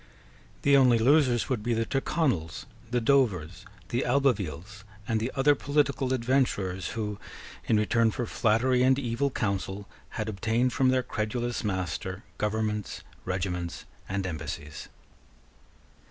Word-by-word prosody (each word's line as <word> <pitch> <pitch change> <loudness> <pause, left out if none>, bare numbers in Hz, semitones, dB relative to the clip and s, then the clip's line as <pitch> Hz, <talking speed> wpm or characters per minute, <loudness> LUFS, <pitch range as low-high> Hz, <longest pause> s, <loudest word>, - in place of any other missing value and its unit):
The 140 0 +5
only 125 -3 +6
losers 130 0 +3
would 130 -5 -1
be 120 +2 0
the 115 0 0
Tyrconnels, 130 - -1 0.2
the 120 +1 +1
Dovers, 110 - +1 0.2
the 120 - 0
Albevilles, 105 - 0 0.2
and 110 -1 +1
the 115 +4 -2
other 140 +2 +5
political 140 -2 0
adventurers 115 - 0
who, 105 -2 -3 0.5
in 110 - +3
return 115 +2 +3
for 120 +2 -3
flattery 120 +3 +2
and 130 +1 +4
evil 125 +1 0
counsel, 100 -3 -3 0.3
had 110 -1 -2
obtained 115 +4 0
from 130 -1 +3
their 130 0 +2
credulous 120 +3 -2
master 95 0 -3 0.2
governments, 105 -1 -2 0.2
regiments, 90 -2 -3 0.2
and 95 0 -2
embassies. 75 -3 -6
115 Hz, 125 wpm, -28 LUFS, 100-130 Hz, 0.5 s, only